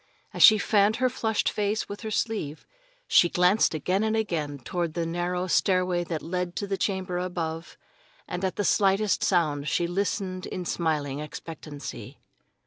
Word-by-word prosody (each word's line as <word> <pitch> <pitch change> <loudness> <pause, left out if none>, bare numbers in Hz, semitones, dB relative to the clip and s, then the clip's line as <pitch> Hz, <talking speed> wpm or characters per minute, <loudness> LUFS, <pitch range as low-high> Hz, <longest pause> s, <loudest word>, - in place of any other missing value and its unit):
As - - -4
she 215 - +9
fanned 205 0 +3
her 255 +1 +1
flushed 220 -3 -1
face 210 +1 -1
with 205 - -7
her 220 - -4
sleeve, 210 -9 -2 0.4
she 175 - +5
glanced 180 +1 +3
again 185 +7 0
and 220 0 +1
again 165 -10 -2
toward 170 +5 -3
the 170 -1 -1
narrow 175 +2 -2
stairway 185 -1 +2
that 165 -2 -4
led 180 +1 -3
to 205 - -2
the 200 -1 -2
chamber 190 -2 -2
above, 170 -2 -4 0.5
and 180 - -4
at 190 - -1
the 205 - -1
slightest 195 +1 +2
sound 150 -6 +1
she 175 - +1
listened 185 +1 -2
in 180 - -5
smiling 150 -5 -1
expectancy. 150 -1 -8
180 Hz, 160 wpm, -26 LUFS, 165-200 Hz, 0.5 s, she